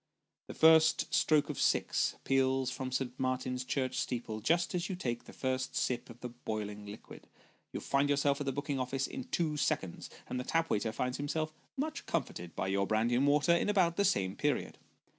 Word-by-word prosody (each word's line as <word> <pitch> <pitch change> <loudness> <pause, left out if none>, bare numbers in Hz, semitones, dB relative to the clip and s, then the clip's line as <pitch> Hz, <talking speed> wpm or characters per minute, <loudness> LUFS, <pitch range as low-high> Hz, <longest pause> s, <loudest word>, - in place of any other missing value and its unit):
The - - -8
first 160 0 +5
stroke 155 -2 +4
of - - -4
six - - +2
peals 130 -1 +2
from 130 0 -4
St. 130 -1 -1
Martin's 130 0 -1
church 130 0 -1
steeple, 115 -3 -3
just 170 +9 +2
as 175 +1 -1
you 190 - -2
take 120 -9 -3
the - - -11
first 130 0 -2
sip 125 - -1
of 120 +1 -12
the 125 - -4
boiling 105 -3 -5
liquid. 105 +2 -11 0.4
You - - -5
find 140 +1 +1
yourself 140 0 +2
at 140 - -3
the - - +2
booking 140 0 -2
office 130 +1 -1
in 265 -2 -6
two 165 -10 -1
seconds, 100 - -1 0.2
and 125 - -3
the - - -2
tap 165 +4 0
waiter 110 +1 +1
finds 125 +2 -2
himself 155 +2 -2 0.2
much 310 +3 -3
comforted 90 - -3
by - - -1
your 100 0 +1
brandy 110 +3 +1
and 130 +4 +3
water, 150 +3 +4
in 170 - +1
about 180 -5 +3
the 200 - +2
same 95 - +1
period. - - -1
130 Hz, 200 wpm, -32 LUFS, 120-155 Hz, 0.4 s, first